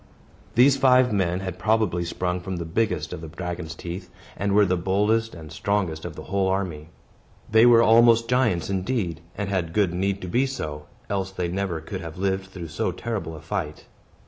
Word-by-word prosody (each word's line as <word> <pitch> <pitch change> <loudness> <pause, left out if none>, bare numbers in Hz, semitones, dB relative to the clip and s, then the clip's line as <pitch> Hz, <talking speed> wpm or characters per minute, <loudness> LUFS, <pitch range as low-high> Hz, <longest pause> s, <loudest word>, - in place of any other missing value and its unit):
These 135 +3 +6
five 130 -3 +5
men 90 -2 0
had 95 -2 -5
probably 105 -3 +1
sprung 90 +1 -2
from 95 +1 -5
the 85 -1 -4
biggest 110 +7 -1
of - - -6
the 80 - -7
dragon's 85 0 -5
teeth, 90 +2 -7 0.3
and 100 0 -1
were 105 0 +6
the 90 -1 +1
boldest 105 +5 +1
and 80 -2 -10
strongest 95 -4 -1
of 85 -3 -6
the - - -8
whole 95 0 0
army. 90 -5 -2 0.6
They 110 +2 +7
were 115 -1 +7
almost 115 0 +6
giants 115 -9 +1
indeed, 95 -4 -2 0.2
and 100 -1 -2
had 90 -4 -1
good 100 -5 +2
need 95 +2 0
to - - -4
be 125 +9 +2
so, 75 - -5 0.2
else 95 -1 -1
they 90 -2 -3
never 95 -2 -2
could 95 +4 -6
have 80 -1 -8
lived 95 0 -1
through 90 -4 -8
so 85 +3 -1
terrible 90 -5 -4
a 75 - -10
fight. 80 -3 -4
95 Hz, 195 wpm, -24 LUFS, 85-105 Hz, 0.6 s, They